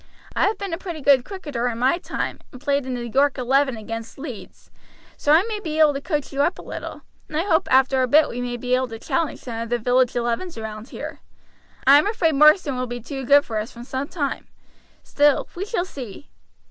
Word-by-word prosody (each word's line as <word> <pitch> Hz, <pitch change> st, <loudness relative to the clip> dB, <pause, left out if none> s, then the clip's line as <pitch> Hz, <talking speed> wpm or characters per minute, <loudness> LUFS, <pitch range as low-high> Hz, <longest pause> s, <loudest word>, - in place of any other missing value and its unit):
I -, -, +3 dB
have 420 Hz, 0 st, -1 dB
been 395 Hz, -3 st, -5 dB
a 330 Hz, -, -3 dB
pretty 345 Hz, -4 st, -6 dB
good 275 Hz, -3 st, +4 dB
cricketer 290 Hz, -9 st, -4 dB
in 235 Hz, -2 st, -2 dB
my 260 Hz, +8 st, +2 dB
time, -, -, -4 dB
and 255 Hz, -, -11 dB
played 280 Hz, -1 st, 0 dB
in 255 Hz, -, -2 dB
the 240 Hz, -1 st, -4 dB
York 275 Hz, +4 st, +2 dB
Eleven 265 Hz, 0 st, +2 dB
against 225 Hz, +1 st, -7 dB
Leeds, 270 Hz, -6 st, -9 dB, 0.4 s
so 290 Hz, -, 0 dB
I 320 Hz, +4 st, +6 dB
may 430 Hz, -1 st, -4 dB
be 315 Hz, -6 st, -4 dB
able 305 Hz, -2 st, +6 dB
to 275 Hz, -, -4 dB
coach 295 Hz, -2 st, -3 dB
you 275 Hz, -, +1 dB
up 345 Hz, -, +1 dB
a -, -, -10 dB
little, -, -, -7 dB, 0.2 s
and 305 Hz, -, -4 dB
I 325 Hz, -, +1 dB
hope 350 Hz, -5 st, +2 dB
after 265 Hz, 0 st, +4 dB
a 255 Hz, -, +2 dB
bit 300 Hz, +5 st, +5 dB
we 245 Hz, -, -5 dB
may 245 Hz, 0 st, -3 dB
be 250 Hz, +1 st, -2 dB
able 255 Hz, 0 st, +2 dB
to 225 Hz, -1 st, -8 dB
challenge 320 Hz, +7 st, -2 dB
some 230 Hz, -2 st, -5 dB
of 230 Hz, -, -5 dB
the 240 Hz, -, +1 dB
village 245 Hz, +2 st, +2 dB
elevens 240 Hz, +8 st, -2 dB
round 220 Hz, +2 st, -7 dB
here. -, -, -7 dB, 0.7 s
I 280 Hz, +2 st, +8 dB
am 305 Hz, -, +1 dB
afraid 355 Hz, -7 st, +1 dB
Marsden 300 Hz, -1 st, +5 dB
will 255 Hz, -, -2 dB
be 245 Hz, 0 st, -5 dB
too 270 Hz, +3 st, -6 dB
good 285 Hz, +2 st, +6 dB
for 220 Hz, -2 st, -2 dB
us 215 Hz, +4 st, -5 dB
for 235 Hz, -, -9 dB
some 265 Hz, +3 st, -4 dB
time; 290 Hz, -5 st, -3 dB, 0.6 s
still, 290 Hz, -1 st, +2 dB
we 370 Hz, +3 st, -4 dB
shall 395 Hz, -5 st, -1 dB
see." 260 Hz, -, -9 dB
270 Hz, 235 wpm, -23 LUFS, 245-305 Hz, 0.7 s, I